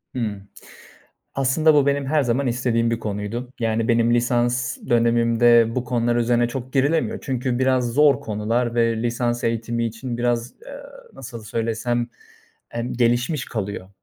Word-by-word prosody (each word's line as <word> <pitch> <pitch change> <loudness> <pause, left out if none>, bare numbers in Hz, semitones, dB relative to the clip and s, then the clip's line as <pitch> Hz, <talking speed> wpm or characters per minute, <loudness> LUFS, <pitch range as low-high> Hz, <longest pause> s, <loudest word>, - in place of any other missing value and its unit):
Hımm. 105 -5 -4 0.9
Aslında 150 +4 +3
bu 140 -1 +4
benim 140 -1 +1
her 150 0 +2
zaman 130 +2 0
istediğim 120 -1 0
bir 115 - -1
konuydu. 110 +4 -4
Yani 115 0 0
benim 115 0 +3
lisans 120 +1 0
dönemimde 115 0 +4
bu 125 - -1
konular 120 -1 0
üzerine 120 0 +2
çok 130 +1 -6
girilemiyor. 145 +4 +1
Çünkü 125 -2 -2
biraz 130 -2 +1
zor 145 +1 +4
konular 115 +3 -1
ve 115 -1 +1
lisans 120 0 -1
eğitimi 115 0 -1
için 115 +2 -4
biraz, 120 0 -1
eee, - - -9 0.4
nasıl 120 -3 -9
söylesem, 115 +2 -2 0.7
emm, 120 +1 -3
gelişmiş 125 +5 +1
kalıyor. 100 -6 -5
120 Hz, 140 wpm, -22 LUFS, 115-125 Hz, 0.9 s, bu